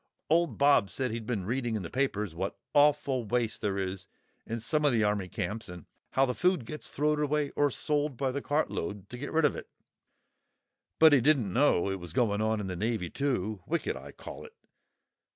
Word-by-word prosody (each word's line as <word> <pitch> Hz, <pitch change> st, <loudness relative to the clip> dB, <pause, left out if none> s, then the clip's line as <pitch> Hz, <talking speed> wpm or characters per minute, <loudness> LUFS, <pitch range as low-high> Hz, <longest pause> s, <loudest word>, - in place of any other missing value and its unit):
Old 165 Hz, -7 st, +3 dB
Bob 140 Hz, -8 st, +4 dB
said 130 Hz, +3 st, -2 dB
he'd 115 Hz, -1 st, -5 dB
been 105 Hz, -7 st, -2 dB
reading 120 Hz, +1 st, -1 dB
in 105 Hz, -, -3 dB
the 85 Hz, -, -6 dB
papers 105 Hz, -8 st, -1 dB
what 95 Hz, +4 st, -4 dB, 0.2 s
awful 145 Hz, -3 st, +3 dB
waste 115 Hz, 0 st, -1 dB
there 100 Hz, -2 st, -1 dB
is 95 Hz, 0 st, -4 dB, 0.4 s
in 115 Hz, +1 st, -3 dB
some 150 Hz, +7 st, 0 dB
o' 145 Hz, -, +5 dB
the 115 Hz, -4 st, +2 dB
army 105 Hz, -2 st, 0 dB
camps 110 Hz, +3 st, -4 dB
and 90 Hz, -2 st, -9 dB, 0.3 s
how 135 Hz, -, +4 dB
the 125 Hz, -, -1 dB
food 180 Hz, -4 st, +1 dB
gets 150 Hz, +5 st, -7 dB
throw'd 150 Hz, +1 st, +1 dB
away 150 Hz, -1 st, 0 dB
or 145 Hz, 0 st, +2 dB
sold 145 Hz, 0 st, -1 dB
by 135 Hz, 0 st, 0 dB
the 140 Hz, +2 st, -3 dB
cartload, 105 Hz, -, -2 dB
to 125 Hz, -, -7 dB
get 145 Hz, -, -5 dB
rid 160 Hz, -1 st, +3 dB
of 145 Hz, -, +2 dB
it, -, -, -8 dB, 1.3 s
but 160 Hz, -1 st, +7 dB
he 135 Hz, -, +6 dB
didn't 120 Hz, -9 st, +2 dB
know 130 Hz, -9 st, +3 dB
it 95 Hz, -1 st, -2 dB
was 85 Hz, -2 st, -9 dB
going 105 Hz, -3 st, +1 dB
on 110 Hz, 0 st, +1 dB
in 105 Hz, -, -3 dB
the 95 Hz, -1 st, -4 dB
navy 105 Hz, -2 st, -2 dB
too—wicked, 120 Hz, -, -2 dB
I -, -, -9 dB
call -, -, -9 dB
it. 460 Hz, -, -13 dB
120 Hz, 205 wpm, -29 LUFS, 105-145 Hz, 1.3 s, but